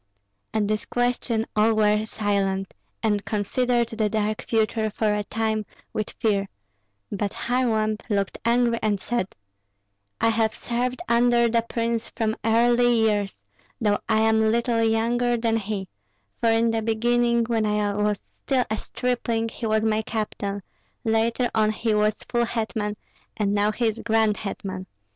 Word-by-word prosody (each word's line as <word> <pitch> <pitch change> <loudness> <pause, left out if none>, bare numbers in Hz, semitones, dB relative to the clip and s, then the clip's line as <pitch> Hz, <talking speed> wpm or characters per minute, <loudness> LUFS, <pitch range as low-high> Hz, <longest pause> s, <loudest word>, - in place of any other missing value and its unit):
At 215 -2 0
this 215 0 -1
question 245 -2 0
all 220 +1 +4
were 210 0 +2
silent, 195 -3 -1 0.3
and 210 -2 +1
considered 235 +3 0
the 220 -2 0
dark 215 0 -1
future 220 -1 +1
for 215 0 0
a 210 0 -1
time 220 0 -1 0.3
with 215 - -2
fear; 200 -3 +1 0.6
but 205 0 -2
Kharlamp 220 -3 0
looked 200 -2 -1
angry 235 0 +2
and 210 -2 +1
said, 235 -2 -2 0.8
"I - - +3
have 220 -1 +1
served 250 +5 -2
under 235 0 +4
the 230 0 +2
prince 230 0 -2
from 220 -1 -1
early 240 +2 +4
years, 215 -4 +1 0.4
though 210 -3 +2
I 220 -1 +3
am 220 0 +4
little 235 0 +1
younger 235 +2 +2
than 225 -1 +1
he; 200 -2 -3 0.5
for 230 - +2
in 225 0 +3
the 225 0 0
beginning, 235 +1 +2
when 225 -2 0
I 210 -1 +1
was 210 0 -2
still 260 -3 +1
a 220 - 0
stripling, 235 -2 -1
he 230 0 -4
was 215 0 +2
my 220 -1 +2
captain, 205 -2 -3 0.4
later 230 +2 +1
on 215 -1 +3
he 220 +1 0
was 210 0 +1
full 240 -1 +1
hetman, 220 -2 -2 0.4
and 205 -2 +1
now 205 +1 +2
he 235 +3 -1
is 220 0 0
grand 220 -2 +2
hetman. 190 -2 -5
220 Hz, 155 wpm, -24 LUFS, 210-235 Hz, 0.8 s, all